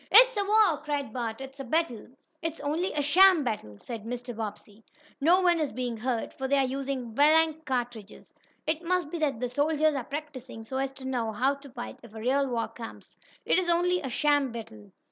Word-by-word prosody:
"It's - - +8
a 405 - +1
war!" 405 -6 +4
cried 285 -6 -3
Bert. 235 -1 -3
"It's 270 +1 -9
a - - -4
battle!" 265 -3 -1 0.3
"It's 330 -1 -3
only 315 +6 -1
a 295 - 0
sham 355 +2 +6
battle!" 210 - -4
said 230 -4 -6
Mr. 245 +1 -5
Bobbsey. 210 0 -7 0.4
"No 350 +6 +5
one 350 -2 +3
is 305 -3 -1
being 245 -2 -3
hurt, 240 0 -2
for 265 - -4
they 280 +1 +3
are 270 - +3
using 260 -3 -3
blank 315 +3 +4
cartridges. 240 -5 -4 0.3
It 315 +1 -1
must 355 -3 0
be 340 - -3
that 280 -7 0
the 250 - -1
soldiers 300 +4 +2
are 270 -3 -2
practicing 265 -5 -7
so 260 +4 -4
as 270 0 -1
to 265 -1 -10
know 245 -4 -1
how 260 +6 +1
to 280 0 -12
fight 245 -1 -8
if 230 -2 -14
a - - -6
real 270 +5 +1
war 230 -2 -1
comes. 230 -2 -10 0.3
It - - +4
is 360 -2 -1
only 355 +1 +2
a 265 - -4
sham 290 0 +2
battle." 110 - -9
270 Hz, 210 wpm, -28 LUFS, 240-315 Hz, 0.4 s, It's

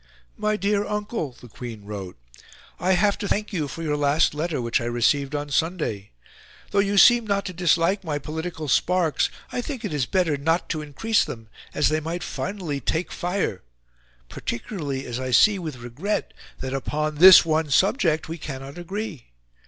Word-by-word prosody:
"My 215 0 0
dear 205 +1 +1
Uncle," 210 - -3
the 125 - -12
Queen 115 -2 -9
wrote, 100 -3 -7 0.6
"I 185 +3 +2
have 200 +2 +2
to 205 - -3
thank 210 +2 -1
you 155 -6 -1
for 165 +4 -7
your 150 -2 0
last 145 +2 +2
letter 155 0 -2
which 115 -1 0
I - - -3
received 135 +4 +1
on 145 0 -4
Sunday. 150 - -1 0.6
Though 200 - +2
you 200 0 +1
seem 240 +2 +7
not 200 -1 0
to 185 - -5
dislike 175 +3 +2
my 155 -4 -2
political 160 +2 -5
sparks, 170 +3 +2 0.2
I 245 - -2
think 250 -3 -5
it 195 - -3
is 135 -5 0
better 175 -6 +1
not 165 +5 0
to 155 - -2
increase 180 +10 +1
them, 115 -2 -8 0.3
as 150 - +3
they 155 +1 +1
might 165 +3 -4
finally 180 -8 -4
take 160 +7 -2
fire, 175 - -2 0.7
particularly 140 - -4
as 120 0 -4
I 130 0 -3
see 200 - +5
with 155 -7 -5
regret 125 - -3 0.3
that 130 0 -4
upon 150 +2 -2
this 185 +2 +10
one 160 -1 +1
subject 165 - +2
we 165 +1 -6
cannot 140 +1 -7
agree. 180 - -5
160 Hz, 175 wpm, -24 LUFS, 140-190 Hz, 0.7 s, this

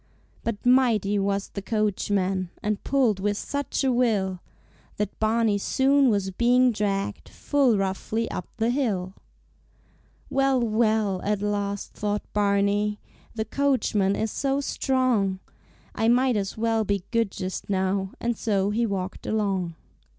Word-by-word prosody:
But 230 -1 -4
mighty 230 -6 +3
was 200 0 -1
the 200 - -6
coachman 195 -3 0
And 210 -1 -1
pulled 250 -8 +2
with 205 +1 0
such 285 +3 -2
a 265 - +3
will 210 -7 +1 0.6
That 210 -1 -3
Barney 220 -1 +2
soon 270 +5 +3
was 200 -3 0
being 245 +5 +4
dragged 200 -2 -2
Full 270 -7 +2
roughly 195 +4 -1
up 180 - -5
the 230 +1 +1
hill. 200 -9 -1 1.1
"Well, 270 -1 +2
well!" 215 -4 +1
at 205 0 -1
last 205 -1 -2
thought 205 0 -2
Barney, 205 0 +1 0.4
"The 220 -1 -2
coachman 225 -7 +1
is 220 -1 -1
so 275 0 0
strong, 255 -9 0 0.5
I 225 - 0
might 250 +1 +3
as 195 0 -2
well 225 0 +1
be 200 -2 -1
good 230 -3 +2
just 185 +1 -5
now," 190 0 0
And 235 0 -1
so 200 -2 0
he 230 +2 +1
walked 190 -2 -4
along. 195 -6 -1
210 Hz, 135 wpm, -25 LUFS, 195-235 Hz, 1.1 s, being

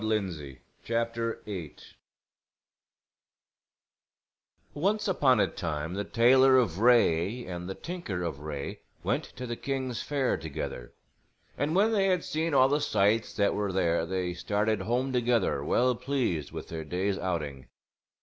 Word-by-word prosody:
THE 90 -11 -2 0.3
GREAT 115 0 -1
WHITE 115 -1 -3
BEAR 90 -8 -6 3.0
Once 205 +7 0
upon 135 - +3
a - - +5
time 80 -1 -4
the 100 +2 -2
tailor 130 +4 +5
of 100 -9 +1
Wraye 115 -2 +3
and 90 0 -6
the 95 - -4
tinker 165 - -5
of 80 -5 -3
Wraye 75 -2 -5 0.2
went - - 0
to 125 - -6
the 120 -1 -3
king's 130 -2 -3
fair 140 -3 0
together; 65 -5 -6 0.6
and 150 +3 -1
when 210 +4 +4
they 200 -3 +2
had 180 -3 +2
seen 160 0 -1
all 130 -1 +6
the 145 +1 +1
sights 110 -4 +1
that 100 -1 +2
were 100 -1 -1
there 85 -3 +1
they 90 -1 -2
started 105 +4 0
home 125 +3 -1
together 120 - +1
well 125 - +2
pleased 125 - -2
with - - -7
their 80 -1 -5
day's 95 +5 -1
outing. 75 -8 -3
110 Hz, 145 wpm, -29 LUFS, 90-130 Hz, 3.0 s, all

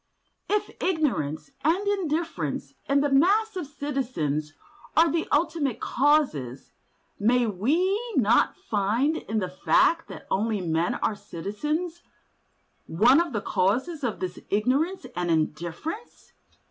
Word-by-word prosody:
If 420 0 0
ignorance 275 - -1
and 355 +7 +2
indifference 340 -5 -2 0.2
in 280 0 +4
the 290 -1 0
mass 405 +10 +3
of 355 -6 -4
citizens 250 - -2 0.5
are 325 0 +6
the 330 -1 -1
ultimate 300 -5 +1
causes, 250 - +1 0.5
may 240 +4 +3
we 285 - +1 0.2
not 230 -3 +3
find 225 +10 0
in 220 - -4
the 190 -4 0
fact 190 - +2
that - - -10
only 215 +1 +1
men 170 -1 0
are - - 0
citizens 300 - -4 0.9
one 240 - +5
of 340 -3 -3
the 210 -4 -2
causes 240 - 0
of 235 -4 -2
this 185 -1 -4
ignorance 270 - +1
and 175 -1 -1
indifference? 170 - -3
270 Hz, 120 wpm, -26 LUFS, 195-325 Hz, 0.9 s, are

